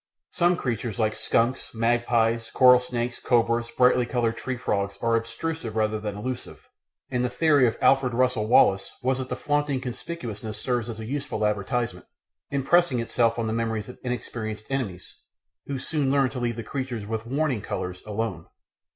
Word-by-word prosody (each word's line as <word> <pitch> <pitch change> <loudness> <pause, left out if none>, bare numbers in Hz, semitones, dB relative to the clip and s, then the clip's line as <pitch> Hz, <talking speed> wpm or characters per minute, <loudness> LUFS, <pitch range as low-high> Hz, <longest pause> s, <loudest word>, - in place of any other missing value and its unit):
Some 175 0 +2
creatures 120 -2 -3
like 110 -2 +1
skunks, 115 +3 0
magpies, 115 0 +1
coral 125 -1 +7
snakes, 125 -1 -3
cobras, 115 -1 +2
brightly 125 0 +3
coloured 120 -2 0
tree 130 +1 -4
frogs 100 -4 -1
are 115 +1 +2
obtrusive 115 +1 -3
rather 110 -1 +1
than 105 -1 -4
elusive, 125 +4 -6 0.4
and 125 -1 0
the 125 - +1
theory 145 0 +4
of 115 - -1
Alfred 135 -3 +4
Russel 125 -3 +2
Wallace 95 -4 +4
was 130 +1 +1
that 130 0 -4
the - - -2
flaunting 145 -2 0
conspicuousness 120 -5 -6
serves 120 -1 -1
as 110 -1 -6
a 110 - -5
useful 135 -4 -2
advertisement, 105 -1 -1 0.4
impressing 140 0 +3
itself 115 0 +1
on 115 - -1
the 110 - -1
memories 115 -2 -2
of 125 - -11
inexperienced 110 -3 -4
enemies, 105 -10 -4 0.5
who 140 - -2
soon 140 +1 -1
learn 135 -2 +3
to 130 - -5
leave 120 -1 -2
creatures 130 -5 -4
with 110 +1 -4
"warning 135 -3 0
colours" 90 -3 -4
alone. 105 -5 -3
120 Hz, 165 wpm, -26 LUFS, 110-130 Hz, 0.5 s, coral